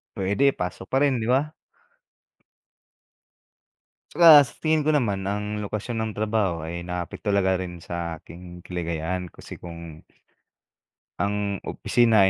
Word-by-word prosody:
puwede. 100 +9 +2
Pasok 90 +1 -5
pa 135 +2 +2
rin, 135 -4 +2
'di 110 - -3
ba? 135 +5 +2 2.6
Plus 150 -5 +8
tingin 155 -1 +2
ko 155 - +4
naman 100 -8 0
ang 105 +1 -2
lokasyon 105 +3 -4
ng 110 0 -1
trabaho 105 -6 0
ay 85 +2 -5
naka-affect 90 +4 -6
talaga 95 -2 +2
rin 90 -2 -6
sa 85 -1 -4
aking 90 +2 -12
kaligayahan. 90 0 -3
Kasi - - -11
kung 85 -2 -9 1.2
Ang 100 0 -1
opisina 110 -5 +3
100 Hz, 120 wpm, -25 LUFS, 90-115 Hz, 2.6 s, Plus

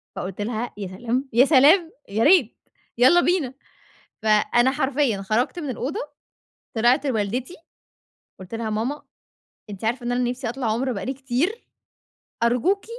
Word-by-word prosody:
فقُلت 195 +2 -5
لها: 225 +2 -3
"يا 200 -2 -5
سلام، 240 +8 -3
يا 250 +4 +6
سلام، 320 +5 +5 0.2
يا 215 +3 0
ريت 300 - +4 0.4
يالّا 260 +9 +6
بينا." 335 -9 0 0.7
فأنا 220 +4 +3
حرفيًا 265 -6 0
خرجت 230 - -1
من 295 - -5
الأوضة، 255 +4 -3 0.8
طلعت 245 +6 +3
لوالدتي، 245 - -2 0.9
قلت 185 +4 -9
لها: 225 -1 -3
"ماما، 235 +8 -2 0.7
أنتِ 200 0 -9
عارفة 240 +2 -1
إن 245 - -1
أنا 245 0 0
نفسي 250 -2 -4
أطلع 250 -1 -3
عُمرة 255 +4 -1
بقى 200 - -4
لي 265 - -2
كتير، 275 - -2 0.8
أرجوكِ 250 - +1
245 Hz, 145 wpm, -23 LUFS, 225-275 Hz, 0.9 s, يا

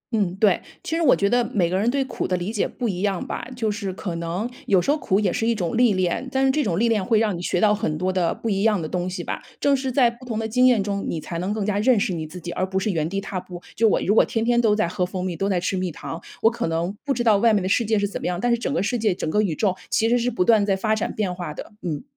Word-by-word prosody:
嗯， 190 -4 0
对， 195 -2 +3 0.2
其 320 - -2
实 335 - 0
我 295 -6 +5
觉 200 - +1
得 245 +3 +3
每 175 -4 +2
个 185 - +1
人 220 +4 +2
对 275 +2 +1
苦 - - -3
的 180 - 0
理 180 +5 -4
解 215 - 0
不 245 - -4
一 185 -3 -3
样 195 -3 -1
吧， - - -5
就 225 -3 -1
是 205 -2 -3
可 185 -1 -5
能 170 +7 -3 0.2
有 195 -3 +4
时 230 - +1
候 305 - +2
苦 195 -8 +1
也 200 -4 +1
是 225 -2 -1
一 235 - +2
种 180 -3 -2
历 240 -2 +4
练， 185 +7 -1
但 265 +1 +2
是 265 - +4
这 300 +2 +1
种 180 -5 0
历 235 - +3
练 220 -4 +1
会 220 +4 +2
让 215 -4 +1
你 170 - -6
学 175 - 0
到 210 -1 +4
很 155 -7 -1
多 185 +2 -1
的 175 -3 +1
不 230 - -6
一 195 -2 0
样 215 -2 +3
的 155 - -4
东 180 +1 -2
西 180 -1 -5
吧， - - -4 0.2
正 285 -1 +3
是 265 -1 -2
在 245 -2 +4
不 235 +2 -16
同 230 -3 -4
的 220 0 -2
经 250 +3 +4
验 235 -6 +4
中， 200 0 -2
你 165 - -2
才 170 +2 -5
能 185 +3 -2
更 210 -1 -2
加 205 -1 0
认 230 0 +4
识 200 -3 0
你 160 -2 -4
自 175 +4 -9
己， 175 0 -6
而 185 - -2
不 190 0 -2
是 205 +2 -1
原 160 -2 -1
地 195 - -2
踏 195 -1 -4
步。 180 -1 -9 0.2
就 225 0 +4
我 - - +2
如 205 - +2
果 - - +6
天 225 -1 -1
天 240 0 +3
都 215 -2 +3
在 210 -5 +1
喝 180 - -2
蜂 180 0 -3
蜜， 180 -2 -3
都 195 +4 -1
在 180 -2 +1
吃 185 +2 -1
蜜 185 -1 -2
糖， 165 +1 -7 0.2
我 225 - +6
可 235 - -3
能 165 +4 -2
不 285 - -2
知 240 - -1
道 215 -3 +5
外 230 +2 +4
面 205 -3 +2
的 - - -1
世 225 +5 +2
界 220 -1 +1
是 205 - +1
怎 200 - -6
么 - - -2
样， 175 0 -2
但 245 +5 +1
是 235 - +3
整 255 - -2
个 255 - 0
世 235 +3 -1
界、 210 -4 +1
整 160 - -4
个 210 +7 +2
宇 185 -7 -1
宙 195 -1 +1
其 225 - +2
实 245 - +3
是 240 +1 0
不 180 -7 0
断 220 -1 +5
在 200 -1 +1
发 215 +3 0
展 215 - -2
变 200 -4 -2
化 175 -4 -6
的， - - -8
嗯。 160 -4 -4
205 Hz, 360 characters per minute, -23 LUFS, 180-230 Hz, 0.2 s, 果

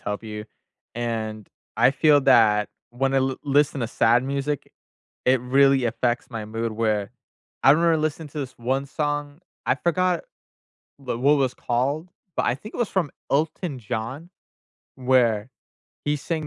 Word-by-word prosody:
help 105 +1 -4
you, 105 -1 -6 0.5
and 110 -3 -3 0.3
I 130 - +5
feel 145 +1 +4
that 110 -5 +5 0.2
when 135 +2 0
I 135 - +5
l 130 0 0
listen 145 -1 +2
to 115 - 0
sad 120 +2 +3
music, 140 +1 -3 0.5
it 130 -1 +4
really 135 +1 +4
affects 120 +1 -1
my 115 -2 -5
mood 115 +1 -3
where 110 -2 0 0.5
I 135 - +7
remember 165 +1 +3
listen 155 +1 -2
to 150 - -8
this 130 -3 -4
1 130 +3 -1
song. 145 +2 -3 0.3
I - - +3
forgot 180 +1 +1 0.8
the 130 -4 -4
what 140 +4 +5
was 130 -2 +1
called, 140 +7 -1 0.3
but - - +1
I 120 - +1
think 210 - -11
it - - -7
was 240 -4 +1
from 175 -7 -1 0.2
Elton 155 0 -1
John 120 +9 -5 0.7
where 125 -4 +2 0.6
he 150 0 +1
sang 155 +2 -3
130 Hz, 155 wpm, -24 LUFS, 115-145 Hz, 0.8 s, I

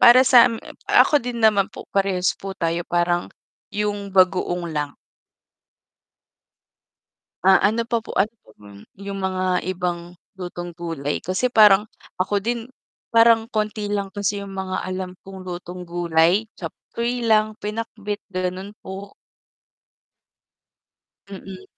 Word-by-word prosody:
para 245 +2 +9
sa, 245 -2 +9
m - - -3 0.4
ako - - +6
din 245 -1 -4
naman 205 -3 +5
po - - -10
parehas 195 -2 +1
po 195 0 -6
tayo 170 0 -1
parang 175 0 0 0.4
yung 205 -1 -2
bagoong 180 -2 +3
lang. 150 -2 -3 2.5
Ah, 190 +1 +6
ano 225 +3 +1
pa 235 0 +2
po - - -7
ano 210 +3 +2
pa - - -19 0.5
yung 200 0 -5
mga 185 -1 0
ibang 175 -1 -3 0.2
lutong 175 -1 -6
gulay? 165 -5 -3
Kasi 190 +8 0
parang 210 -2 +6 0.3
ako 200 +2 +1
din 230 +3 -3 0.4
parang 230 -1 +5
konti 215 -1 -2
lang 200 -1 -1
kasi 205 0 -2
yung 195 -1 -8
mga 190 -1 -3
alam 185 0 -4
kong 190 -1 -10
lutong 180 0 -7
gulay 170 +3 +2
chopsuey 240 +1 -4
lang 215 -1 +3
pinakbet, 210 -1 -4
ganun 185 +2 -3
po. 195 +1 -8 2.1
Mm. 195 -1 -9
195 Hz, 125 wpm, -22 LUFS, 180-210 Hz, 2.5 s, para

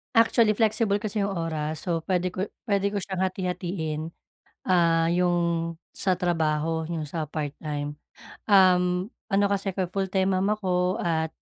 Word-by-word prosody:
Actually 230 -1 +5
flexible 215 -2 +2
kasi 210 -1 -2
'yong 200 - 0
oras, 155 0 -3
so 165 -2 0
puwede 185 0 -1
ko 185 - -2 0.2
puwede 200 -1 +1
ko 205 - -2
siyang 190 0 -3
hati-hatiin. 180 -4 -2 0.7
Ah, 165 -2 +3
'yong 170 -1 +1 0.2
sa 185 -2 0
trabaho 160 -2 0
'yong 160 -2 -4
sa 160 +1 -3
part-time. 145 -1 -4 0.5
Um, 180 0 +4 0.2
ano 200 +1 +4
kasi, 200 0 -1 0.2
full 195 -1 -1
time 190 0 +2
mom 190 +2 +1
ako 185 -2 0
at 160 -4 0
180 Hz, 140 wpm, -26 LUFS, 165-195 Hz, 0.7 s, Actually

